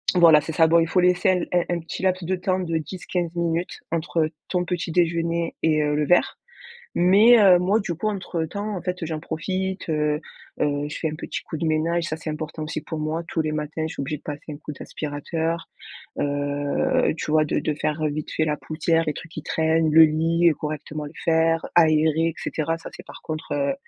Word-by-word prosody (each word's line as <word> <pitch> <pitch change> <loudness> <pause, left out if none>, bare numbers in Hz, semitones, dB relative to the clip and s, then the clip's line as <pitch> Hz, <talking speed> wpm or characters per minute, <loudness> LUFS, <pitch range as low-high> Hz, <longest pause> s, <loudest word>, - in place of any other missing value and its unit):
voilà, 165 -3 +7
c'est 160 +1 -5
ça. 160 0 +5
Bon, 170 +1 +5
il 165 - +2
faut 180 - +2
laisser 180 +1 +3
un 185 - +4
l 180 - -2 0.2
un 175 - +1
un - - -4
petit 165 +2 -7
laps 185 -1 +1
de 185 +3 0
temps 185 +1 -1
de 165 -3 -1
10-15 175 +1 -4
minutes 170 +1 -1
entre 160 -1 0 0.2
ton 180 -1 0
petit 175 -2 -3
déjeuner 170 0 0
et 155 -1 +3
heu, 150 0 0
le 150 0 +1
verre. 175 - +3 0.6
Mais, 210 +7 +6
heu, 190 -3 +7
moi, 195 +5 +2
du 175 -4 -3
coup, 215 +6 -2
entre 185 -5 -2
temps, 205 +4 -4
en - - -5
fait, 180 0 -4
heu, - - -2
j'en 160 -2 -3
profite, 185 +3 -3
heu 150 0 0 0.4
heu, 145 0 0
je 150 - -6
fais 160 - -1
un 155 - -5
petit - - -5
coup 160 - -6
de 165 - -2
ménage, 165 +2 +1
ça 155 - -3
c'est 160 - -6
important 155 0 -5
aussi 155 0 -4
pour 160 -3 -6
moi. 155 +2 -2
Tous 160 - -1
les 155 -1 -2
matins 150 +1 -3
je - - -7
suis - - -5
obligée 150 +2 -3
de - - -22
passer 150 +1 -7
un - - -8
coup 150 - -8
d'aspirateur, 160 +4 -4 0.5
heu, 145 - 0
tu 150 - -3
vois 155 0 +4
de - - 0
de 155 - -1
faire, 155 +1 -2
heu, 150 - +2
vite 150 +1 -5
fait 155 - 0
la 150 -1 0
poussière, 165 +1 0
les 150 - 0
trucs 165 - -10
qui 155 - -7
traînent, 160 0 +1
le 160 +1 +9
lit 165 +2 +2
et 160 - +5
correctement 150 0 -5
le 145 - -8
faire, 165 0 +2
aérer 160 0 +4
et 165 - -3
cetera. 165 +1 -2
Ça 165 - -9
c'est - - -11
par - - -12
contre, 155 0 -6
heu, 280 -1 0
165 Hz, 235 wpm, -24 LUFS, 155-175 Hz, 0.6 s, le